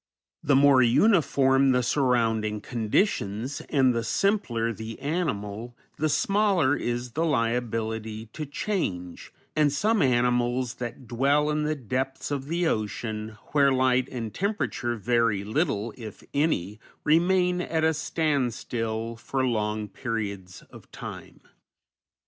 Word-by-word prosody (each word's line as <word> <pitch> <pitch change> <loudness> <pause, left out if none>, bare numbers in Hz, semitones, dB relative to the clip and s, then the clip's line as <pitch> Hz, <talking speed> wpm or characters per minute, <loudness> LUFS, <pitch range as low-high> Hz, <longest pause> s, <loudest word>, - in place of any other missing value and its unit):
The 140 - +3
more 140 -1 +6
uniform 135 - +4
the 125 0 +2
surrounding 115 -5 +1
conditions, 115 - -1
and 130 -4 +3
the 115 -1 -1
simpler 120 - 0
the 110 +1 -7
animal, 120 - -3 0.2
the 155 +1 +1
smaller 185 -3 +2
is 120 -1 -3
the 160 +7 -1
liability 115 -5 -1
to 150 - -5
change, 100 - -3 0.2
and 150 -2 +3
some 210 +9 +1
animals 125 -1 +2
that 120 +1 -6
dwell 140 +6 +2
in 150 0 0
the 155 0 0
depths 130 +2 -3
of 140 -1 -3
the 170 +3 0
ocean, 110 -3 -3
where 140 -2 +4
light 130 0 +2
and 115 -4 -5
temperature 195 - -1
vary 115 -2 +1
little, 110 - -1
if 110 -4 -10
any, 110 - 0 0.2
remain 180 +3 +3
at 160 -2 -1
a 160 0 +3
standstill 120 -7 -2
for 130 +3 -2
long 105 -3 -1
periods 100 -5 -5
of - - -14
time. - - -9
125 Hz, 125 wpm, -26 LUFS, 110-150 Hz, 0.2 s, more